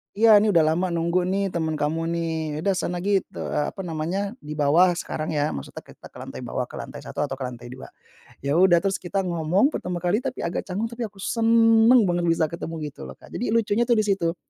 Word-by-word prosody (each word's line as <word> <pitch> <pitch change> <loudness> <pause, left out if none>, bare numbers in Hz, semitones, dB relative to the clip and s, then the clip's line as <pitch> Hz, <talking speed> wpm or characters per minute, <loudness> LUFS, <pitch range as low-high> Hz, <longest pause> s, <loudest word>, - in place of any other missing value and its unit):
"Iya, 220 -1 +7
nih, 210 -2 +2
udah 165 - +6
lama 175 +4 0
nunggu 170 +2 +1
nih 195 0 0
temen 160 -2 -2
kamu 155 +2 -1
nih, 165 -1 -2 0.3
udah 200 - +1
sana 175 0 -3
git 200 -1 +1
eee, 150 - -2
apa 195 - -6
namanya, 165 +2 -3 0.2
di 150 +1 -8
bawah 165 +5 +4
sekarang 155 -2 -4
ya." 145 +1 +1
Maksudnya 70 - -7
kita - - -16
ke - - -16
lantai - - -8
bawah, - - -3
ke - - -9
lantai - - -8
1 - - -10
atau 135 - -5
ke 135 - -8
lantai 120 -1 -6
2. 130 - -11 0.5
Ya 140 +4 +1
udah, 180 -2 +5
terus 195 -1 0
kita 195 +2 -2
ngomong 175 - +1
pertama 180 - -4
kali 180 +5 +2
tapi 255 0 -4
agak 170 - -3
canggung, 210 +5 -3
tapi 235 -1 -4
aku 195 -2 -13
seneng 230 +1 +5
banget 175 0 0
bisa 165 -2 +1
ketemu 165 -1 -6 0.2
gitu 65 - -10
loh 65 - -9
Kak, - - -18
jadi 230 -2 -2
lucunya 230 +1 +2
tuh 240 - +4
di 215 - +2
situ. 190 -5 0
180 Hz, 230 wpm, -24 LUFS, 160-205 Hz, 0.5 s, Iya